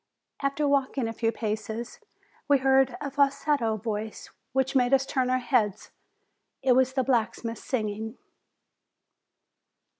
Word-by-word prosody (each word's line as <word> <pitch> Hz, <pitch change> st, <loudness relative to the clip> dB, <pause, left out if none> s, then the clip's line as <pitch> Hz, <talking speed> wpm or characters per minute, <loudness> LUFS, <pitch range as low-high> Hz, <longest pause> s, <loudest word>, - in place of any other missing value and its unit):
After 280 Hz, +1 st, 0 dB
walking 275 Hz, -3 st, +1 dB
a 225 Hz, -, -4 dB
few 225 Hz, 0 st, 0 dB
paces, 220 Hz, +1 st, -4 dB, 0.5 s
we 285 Hz, -1 st, +5 dB
heard 265 Hz, -1 st, +3 dB
a 280 Hz, -, -4 dB
falsetto 280 Hz, -4 st, +1 dB
voice 215 Hz, 0 st, -5 dB, 0.2 s
which 265 Hz, +1 st, 0 dB
made 250 Hz, +1 st, +5 dB
us 270 Hz, 0 st, 0 dB
turn 260 Hz, -2 st, 0 dB
our 255 Hz, -, +3 dB
heads. 225 Hz, -6 st, 0 dB, 0.7 s
It 260 Hz, -, +3 dB
was 260 Hz, +1 st, +4 dB
the 265 Hz, -1 st, +1 dB
black 240 Hz, -4 st, +1 dB
smith 230 Hz, -1 st, -6 dB
singing. 220 Hz, -1 st, -3 dB
255 Hz, 130 wpm, -27 LUFS, 225-270 Hz, 0.7 s, we